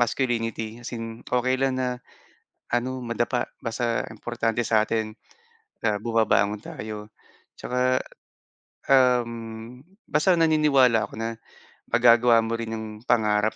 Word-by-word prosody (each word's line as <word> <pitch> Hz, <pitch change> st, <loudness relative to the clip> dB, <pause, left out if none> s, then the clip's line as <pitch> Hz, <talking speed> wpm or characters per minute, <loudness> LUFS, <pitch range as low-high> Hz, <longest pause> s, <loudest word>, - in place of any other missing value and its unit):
masculinity 115 Hz, -2 st, -1 dB
as 120 Hz, 0 st, -6 dB
in 115 Hz, 0 st, -7 dB
okey 130 Hz, +1 st, +1 dB
lang 135 Hz, -1 st, +1 dB
na 125 Hz, -1 st, -2 dB, 0.7 s
ano, 130 Hz, +2 st, -1 dB
madapa 120 Hz, +1 st, -1 dB, 0.2 s
basta 115 Hz, 0 st, -1 dB
importante 115 Hz, +1 st, -2 dB
sa'tin, 110 Hz, 0 st, +1 dB, 0.7 s
ah, 105 Hz, -1 st, +1 dB
bumabangon 110 Hz, -2 st, +2 dB
tayo. 105 Hz, 0 st, -7 dB, 0.5 s
Tsaka, 125 Hz, +1 st, 0 dB, 0.9 s
um, 120 Hz, -2 st, +1 dB, 0.3 s
basta 155 Hz, +5 st, +3 dB
naniniwala 150 Hz, -8 st, +4 dB
ako -, -, -17 dB
na 115 Hz, 0 st, -2 dB, 0.6 s
magagawa 115 Hz, 0 st, +5 dB
mo 115 Hz, +1 st, -2 dB
rin 115 Hz, -1 st, -4 dB
'yong 110 Hz, 0 st, -5 dB, 0.2 s
pangarap 110 Hz, -2 st, +2 dB
115 Hz, 110 wpm, -25 LUFS, 115-125 Hz, 0.9 s, magagawa